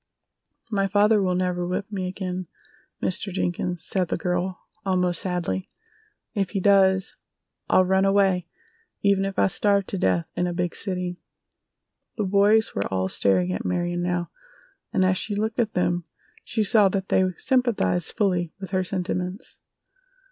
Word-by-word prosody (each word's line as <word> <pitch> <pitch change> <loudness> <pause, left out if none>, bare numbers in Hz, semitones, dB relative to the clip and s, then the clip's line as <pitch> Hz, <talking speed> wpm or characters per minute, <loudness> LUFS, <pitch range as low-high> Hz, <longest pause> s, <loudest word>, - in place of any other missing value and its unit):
"My 195 -2 +1
father 205 +2 +4
will 185 -2 +1
never 180 -1 -1
whip 190 +3 -3
me 190 -3 -3
again, 185 -1 -4 0.6
Mr. 195 +2 -1
Jenkins," 175 -1 -2
said 185 -2 +1
the - - -2
girl, 180 0 -2 0.2
almost 180 -3 +2
sadly. 175 - -2 0.6
"If 195 -3 -1
he 195 - -2
does 190 0 +3 0.5
I'll 185 - +5
run 190 +1 +2
away, 195 -2 +2 0.6
even 200 -1 +3
if 195 -1 -4
I - - +4
starve 200 +1 +2
to 195 - -4
death 90 - +1
in 180 - 0
a 175 - -3
big 175 -1 -1
city." 180 -2 -2 1.0
The 215 - 0
boys 205 +3 +3
were 100 - -1
all 95 0 0
staring 90 -2 +2
at 95 - -3
Marion 175 - -1
now, 175 0 -2 0.6
and 190 -2 +2
as 185 0 +2
she 210 - -2
looked 220 +2 -2
at 225 -3 0
them 175 -1 +1 0.4
she 220 - -1
saw 210 -1 +5
that 190 0 -3
they 190 - +3
sympathized 230 - +1
fully 180 -5 0
with 190 -1 -7
her 185 -1 +1
sentiments. 180 +2 -4
185 Hz, 155 wpm, -24 LUFS, 175-200 Hz, 1.0 s, I'll